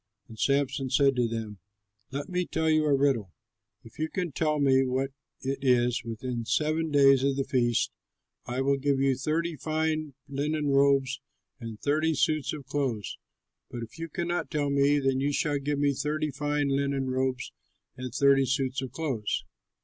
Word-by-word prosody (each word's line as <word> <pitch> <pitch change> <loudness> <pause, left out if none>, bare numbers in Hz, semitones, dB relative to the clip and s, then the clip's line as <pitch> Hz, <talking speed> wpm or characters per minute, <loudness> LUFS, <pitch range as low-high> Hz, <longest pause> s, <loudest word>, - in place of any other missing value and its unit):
And 110 -1 -12
Samson 140 -1 +1
said 135 +1 +3
to 120 -1 +2
them, 110 -3 -5 0.5
"Let 140 +2 -4
me 180 -1 -2
now 180 - -1
tell 160 0 +1
you 155 0 +3
a 145 -2 +4
riddle. 135 -9 +1 0.5
If 115 - -16
you 155 0 -1
can 180 -3 -3
tell 155 +1 0
me 135 -2 +4
what 130 +1 -1 0.3
it 135 +1 -2
is 125 -2 +2
within 120 +2 -4
the 115 - -5
seven 155 +1 +1
days 135 -2 +5
of 140 0 +2
the 135 - 0
feast, 120 -4 +1 0.6
I 125 +2 -2
will 140 +1 +2
give 140 0 +1
you 135 -1 +3
thirty 160 +5 -1
fine 155 -1 -2
linen 145 +2 -1
robes 135 -1 +3 0.4
and 115 -3 -7
thirty 155 +2 +1
suits 155 +1 +1
of 145 -3 -7
clothes; 130 -7 -2 0.5
but 120 -1 -6
if 115 +8 -11
you 165 0 -5
cannot 175 +3 -2
tell 145 -3 -1
me, 140 +1 +3
then 135 -2 +1
you 140 +2 +1
shall 145 0 0
give 145 +1 -2
me 140 0 +2
thirty 150 +2 -1
fine 145 +1 -1
linen 135 -1 0
robes 130 0 -1 0.4
and 130 -1 -6
thirty 135 +1 +4
suits 135 -1 0
of 130 - -5
clothes." 130 -10 -2
140 Hz, 180 wpm, -28 LUFS, 130-150 Hz, 0.6 s, days